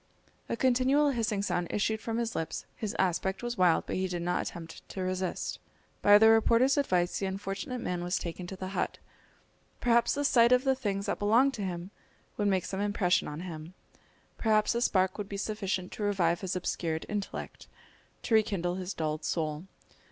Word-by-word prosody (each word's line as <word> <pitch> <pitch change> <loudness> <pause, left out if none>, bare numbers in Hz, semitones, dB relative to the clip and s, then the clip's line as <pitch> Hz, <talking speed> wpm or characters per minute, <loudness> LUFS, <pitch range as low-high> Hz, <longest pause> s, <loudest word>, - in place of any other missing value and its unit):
A 230 - -1
continual 260 +4 +3
hissing 220 -5 -1
sound 175 -3 -1
issued 220 +1 0
from 225 0 -3
his 235 -1 -2
lips, 160 -1 -3
his 215 -3 -4
aspect 190 +3 0
was 240 0 -2
wild, 180 -5 +3
but - - -3
he 190 0 0
did 175 -2 -3
not 175 +1 0
attempt 165 -1 -8
to 190 - -4
resist. 185 0 -2 0.4
By 205 0 +8
the 220 +1 +7
reporter's 230 +4 +4
advice 185 -11 +1
the 195 - -1
unfortunate 195 +5 -4
man 175 -1 -2
was 175 +2 0
taken 175 +1 -5
to 190 - -6
the 185 0 -5
hut. 195 - -2 0.8
Perhaps 235 -1 +3
the 290 - -1
sight 235 -3 +5
of 250 0 +5
the 270 -1 +3
things 200 -6 -2
that - - -2
belonged 235 +7 +4
to 215 - -5
him 180 -1 -4 0.4
would 205 - 0
make 190 -3 +1
some 195 0 -3
impression 205 -3 +1
on 150 +2 -6
him! 170 -1 -8 0.6
Perhaps 215 -1 +3
a 235 - -1
spark 190 -3 +2
would 205 -1 -4
be 200 - -4
sufficient 195 -3 -2
to - - -8
revive 180 -5 +1
his 190 -2 -2
obscured 165 -3 -2
intellect, 205 -1 -5 0.6
to 230 - -2
rekindle 185 -5 +2
his 185 0 -5
dulled 155 -1 -2
soul. 155 0 -2
195 Hz, 190 wpm, -30 LUFS, 180-225 Hz, 0.8 s, By